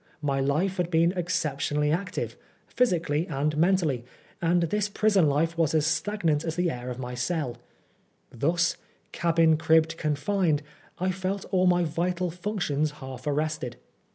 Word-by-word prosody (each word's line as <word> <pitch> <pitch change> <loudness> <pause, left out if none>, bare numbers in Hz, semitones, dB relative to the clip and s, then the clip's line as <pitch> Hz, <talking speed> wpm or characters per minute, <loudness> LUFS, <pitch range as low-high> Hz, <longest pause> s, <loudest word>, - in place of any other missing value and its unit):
My 140 -2 +1
life 155 +8 0
had 175 -1 0
been 165 0 +3
exceptionally 150 -4 -1
active, 180 +3 -2 0.3
physically 170 -9 +1
and 150 0 -1
mentally, 160 -6 +2 0.4
and 170 +1 +3
this 205 +5 0
prison 205 -6 +3
life 160 +4 +1
was 160 -1 +2
as 155 -1 +3
stagnant 160 -1 0
as 160 -1 -3
the 175 -1 +1
air 125 0 -6
of 125 - -5
my 125 -1 -5
cell. 125 0 -2 0.7
Thus 165 +7 +1 0.2
" - - -39
cabin'd 165 -2 +3
cribbed, 160 0 +3
confined," 155 +1 0 0.3
I 185 +1 0
felt 190 +1 -3
all 185 -1 +3
my 175 0 +4
vital 175 +2 -1
functions 175 -5 -1
half 130 -1 -8
arrested. 150 -4 -1
165 Hz, 150 wpm, -27 LUFS, 150-180 Hz, 0.7 s, my